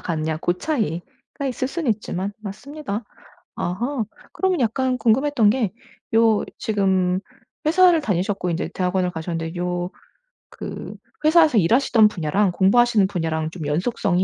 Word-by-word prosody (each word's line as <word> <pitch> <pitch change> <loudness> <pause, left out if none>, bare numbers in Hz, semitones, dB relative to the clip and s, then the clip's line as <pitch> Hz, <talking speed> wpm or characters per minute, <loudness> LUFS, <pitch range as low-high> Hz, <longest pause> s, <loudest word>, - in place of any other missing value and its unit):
가느냐 160 -2 -2
고 175 +2 0
차이가 225 - -4
있을 255 0 -2
수는 305 -3 -1
있지만 200 -2 -3
맞습니다. 220 +2 -6 0.5
아하. 230 +8 -2 0.3
그러면 375 -3 0
약간 255 +2 +1
궁금했던 240 -1 +3
게 220 -5 0 0.4
요 225 -2 +4
지금 190 -4 +1 0.5
회사를 350 +1 +5
다니셨고 195 - -1
인제 170 - -2
대학원을 180 0 0
가셨는데 165 0 -4
요 175 0 -2 0.6
그 - - -7 0.3
회사에서 315 -5 +5
일하시던 225 +3 +4
분야랑 190 +1 0
공부하시는 210 +2 +4
분야랑 160 -4 -2
좀 160 -2 -7
연속성이 180 +3 0
205 Hz, 320 characters per minute, -22 LUFS, 180-250 Hz, 0.6 s, 회사를